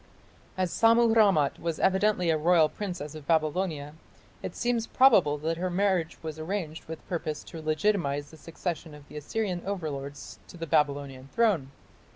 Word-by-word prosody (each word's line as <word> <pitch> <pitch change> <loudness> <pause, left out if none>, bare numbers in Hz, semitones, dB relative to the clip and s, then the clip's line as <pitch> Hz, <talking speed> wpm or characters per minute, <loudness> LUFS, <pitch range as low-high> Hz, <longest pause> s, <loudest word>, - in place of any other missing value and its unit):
As 185 -2 0
Sammu 230 0 +4
rammat 195 -11 +4
was 165 -1 -2
evidently 190 -2 +2
a - - +3
royal 165 -1 +4
princess 175 -7 -5
of 155 -2 -10
Babylonia, 155 -2 0 0.5
it - - -6
seems 240 -2 0
probable 200 - +5
that 160 +2 -2
her 180 +2 -1
marriage 180 -3 0
was 160 -1 -6
arranged 160 -2 -4
with 160 0 -9
purpose 155 -4 -3
to 165 - -9
legitimatize 155 -3 0
the 160 - -13
succession 165 0 -5
of 145 -1 -15
the 150 - -9
Assyrian 180 +4 -2
overlords 145 -7 -5
to - - -12
the 165 - -4
Babylonian 140 -3 0
throne. 205 - +2
165 Hz, 160 wpm, -28 LUFS, 150-190 Hz, 0.5 s, probable